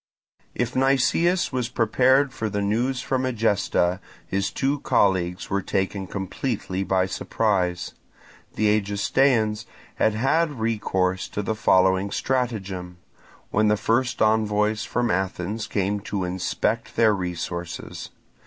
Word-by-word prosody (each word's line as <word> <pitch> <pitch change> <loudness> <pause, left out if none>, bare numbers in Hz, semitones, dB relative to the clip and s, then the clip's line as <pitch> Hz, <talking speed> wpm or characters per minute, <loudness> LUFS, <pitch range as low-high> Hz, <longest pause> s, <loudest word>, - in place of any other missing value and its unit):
If 120 0 -2
Nicias 135 +7 +2
was 125 -2 -1
prepared 130 +4 +3
for 110 - -3
the 100 0 -2
news 120 +5 0
from 130 0 -1
Egesta, 105 -7 +1 0.3
his 100 0 -1
two 140 +2 -1
colleagues 90 -7 +1
were 100 0 +1
taken 95 0 -2
completely 95 0 -3
by 95 -1 +1
surprise. 95 -2 -1 0.6
The 105 0 +3
Egestaeans 110 +2 +1 0.3
had 110 - +2
had 145 +4 +1
recourse 95 -5 0
to 105 - -3
the 110 - -1
following 95 -2 +3
stratagem, 100 -8 -2 0.5
when 110 +1 +3
the 105 0 +3
first 120 +4 +1
envoys 110 0 +2
from 120 0 0
Athens 95 +4 -2
came 100 +1 -1
to 100 -1 -3
inspect 90 0 -2
their 110 -2 +4
resources. 85 -2 -5
105 Hz, 120 wpm, -24 LUFS, 95-120 Hz, 0.6 s, their